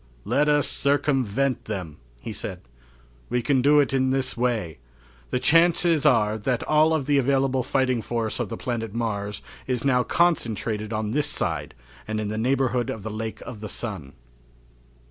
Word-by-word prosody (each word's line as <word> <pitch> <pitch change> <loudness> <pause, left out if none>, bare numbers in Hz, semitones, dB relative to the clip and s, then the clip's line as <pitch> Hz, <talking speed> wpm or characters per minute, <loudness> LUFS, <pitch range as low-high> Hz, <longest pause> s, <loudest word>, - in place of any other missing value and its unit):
"Let 150 +1 +2
us 145 -1 +3
circumvent 135 -3 +1
them," 90 -8 -5 0.2
he - - -6
said. - - -6 0.7
"We 125 0 0
can 135 -1 +2
do 145 +3 +5
it 140 -2 +2
in 130 -1 +2
this 130 0 0
way. 110 - -1 0.5
The - - 0
chances 165 +1 +4
are 110 -5 +3
that 125 +3 -1
all 155 +1 +3
of 145 -4 -1
the 145 0 +3
available 135 0 +1
fighting 130 -1 0
force 115 -1 -2
of - - -2
the 115 - -5
planet 115 -4 -4
Mars 105 -3 -3 0.2
is 125 -1 -1
now 125 -2 +3
concentrated 115 - 0
on 110 -1 -2
this 145 +4 +1
side - - -3 0.3
and 110 0 -2
in 105 -1 -2
the 110 +1 -3
neighborhood 125 0 +1
of 105 - -5
the 110 - -5
Lake 110 +1 -5
of 125 -4 -8
the 105 0 -6
Sun." 95 - -6
125 Hz, 170 wpm, -24 LUFS, 110-140 Hz, 0.7 s, do